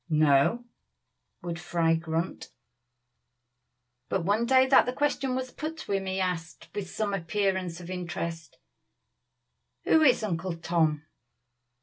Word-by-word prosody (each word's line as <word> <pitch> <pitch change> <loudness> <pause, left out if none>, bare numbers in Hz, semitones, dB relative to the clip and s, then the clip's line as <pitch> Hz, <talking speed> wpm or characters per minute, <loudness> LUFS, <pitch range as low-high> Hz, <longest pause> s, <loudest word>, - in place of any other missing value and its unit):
"No!" 155 - +3 0.8
would 170 -1 -4
Fry 170 -2 +1
grunt. 165 +1 -3 1.6
But 185 -3 -1
one 215 +5 +1
day 260 0 +6
that 265 -2 +5
the 250 - -1
question 275 -2 0
was 255 -1 -3
put 315 +4 -5
to 320 - -7
him 195 -1 -1
he 190 0 -2
asked, 175 -3 -3
with 200 -3 -4
some 210 -2 -2
appearance 190 -1 -1
of 175 +1 -8
interest, 170 -2 -5 1.3
"Who 320 - +4
is 255 -7 +4
Uncle 180 -3 -2
Tom?" 160 -3 0
185 Hz, 125 wpm, -28 LUFS, 165-230 Hz, 1.6 s, day